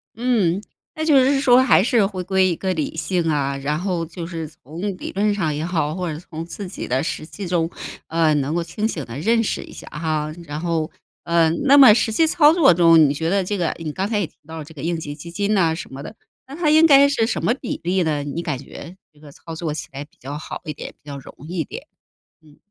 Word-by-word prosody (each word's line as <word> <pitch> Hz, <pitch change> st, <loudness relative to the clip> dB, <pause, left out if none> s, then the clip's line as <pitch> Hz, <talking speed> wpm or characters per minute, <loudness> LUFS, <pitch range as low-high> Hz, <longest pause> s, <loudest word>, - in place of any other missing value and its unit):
嗯， 215 Hz, -7 st, +1 dB, 0.3 s
那 315 Hz, -, -3 dB
就 310 Hz, -3 st, +4 dB
是 270 Hz, +2 st, +4 dB
是 -, -, +1 dB
说 255 Hz, -1 st, +6 dB
还 230 Hz, -6 st, +5 dB
是 230 Hz, -3 st, +3 dB
回 190 Hz, -2 st, -4 dB
归 190 Hz, 0 st, +2 dB
一 175 Hz, -, 0 dB
个 190 Hz, +2 st, -2 dB
理 155 Hz, -1 st, -3 dB
性 165 Hz, +1 st, -1 dB
啊， 140 Hz, -2 st, 0 dB
然 145 Hz, +2 st, -2 dB
后 180 Hz, -2 st, -2 dB
就 165 Hz, +1 st, -7 dB
是 165 Hz, -2 st, -5 dB
从 155 Hz, +2 st, -11 dB, 0.2 s
理 -, -, -6 dB
论 205 Hz, +1 st, +1 dB
上 165 Hz, -7 st, -1 dB
也 155 Hz, +2 st, -3 dB
好， 160 Hz, -3 st, -1 dB
或 180 Hz, -3 st, -3 dB
者 150 Hz, -, -5 dB
从 165 Hz, -1 st, -8 dB
自 195 Hz, +3 st, -7 dB
己 180 Hz, -, -7 dB
的 130 Hz, +3 st, 0 dB
实 155 Hz, -, -4 dB
际 190 Hz, +3 st, -7 dB
中， 170 Hz, -2 st, 0 dB, 0.4 s
呃， 160 Hz, -1 st, +2 dB
能 145 Hz, +2 st, -1 dB
够 170 Hz, -, 0 dB
清 190 Hz, +6 st, -2 dB
醒 160 Hz, -9 st, -4 dB
地 115 Hz, +2 st, -8 dB
认 225 Hz, +7 st, +2 dB
识 -, -, -2 dB
一 -, -, -13 dB
下 -, -, -11 dB
哈。 155 Hz, -1 st, -2 dB
然 150 Hz, 0 st, -5 dB
后 165 Hz, -2 st, -1 dB, 0.3 s
呃， 170 Hz, -1 st, +3 dB, 0.2 s
那 280 Hz, 0 st, +7 dB
么 265 Hz, -6 st, +10 dB
实 220 Hz, 0 st, +1 dB
际 320 Hz, +9 st, +3 dB
操 315 Hz, -1 st, +5 dB
作 325 Hz, -, +6 dB
中， 165 Hz, -1 st, +6 dB
你 145 Hz, -2 st, +5 dB
觉 160 Hz, +3 st, -2 dB
得 195 Hz, +1 st, +2 dB
这 205 Hz, +3 st, -2 dB
个 170 Hz, -3 st, 0 dB
你 160 Hz, -2 st, -4 dB
刚 190 Hz, +6 st, -2 dB
才 210 Hz, -1 st, 0 dB
也 200 Hz, -, 0 dB
提 -, -, -31 dB
到 160 Hz, -, -8 dB
了 160 Hz, -, -5 dB
这 160 Hz, -, -14 dB
个 145 Hz, -, -9 dB
应 165 Hz, +1 st, -1 dB
急 145 Hz, -2 st, -6 dB
基 170 Hz, +3 st, -10 dB
金 200 Hz, +4 st, 0 dB
呐 170 Hz, -5 st, +2 dB
什 160 Hz, -, -8 dB
么 135 Hz, -, -7 dB
的， 160 Hz, -, -9 dB, 0.3 s
那 275 Hz, -, -9 dB
它 320 Hz, -2 st, +1 dB
应 315 Hz, +1 st, +6 dB
该 280 Hz, -1 st, +7 dB
是 230 Hz, -6 st, +1 dB
什 225 Hz, -, -2 dB
么 235 Hz, -, +3 dB
比 250 Hz, -1 st, -5 dB
例 185 Hz, +2 st, +1 dB
呢？ 150 Hz, -3 st, -1 dB
你 145 Hz, +4 st, -4 dB
感 150 Hz, -5 st, -3 dB
觉 165 Hz, +6 st, -11 dB, 0.2 s
这 150 Hz, -, -23 dB
个 150 Hz, -1 st, -14 dB
操 165 Hz, +3 st, -10 dB
作 160 Hz, -2 st, -3 dB
起 -, -, -6 dB
来 140 Hz, +1 st, -6 dB
比 145 Hz, -, -33 dB
较 140 Hz, +3 st, -6 dB
好 -, -, -7 dB
一 150 Hz, -, -4 dB
点， -, -, -8 dB
比 -, -, -45 dB
较 140 Hz, -, -6 dB
容 135 Hz, -, -13 dB
易 175 Hz, 0 st, -4 dB
一 -, -, +1 dB
点， -, -, -9 dB, 0.6 s
嗯。 150 Hz, -2 st, -21 dB
170 Hz, 285 characters per minute, -21 LUFS, 155-205 Hz, 0.6 s, 么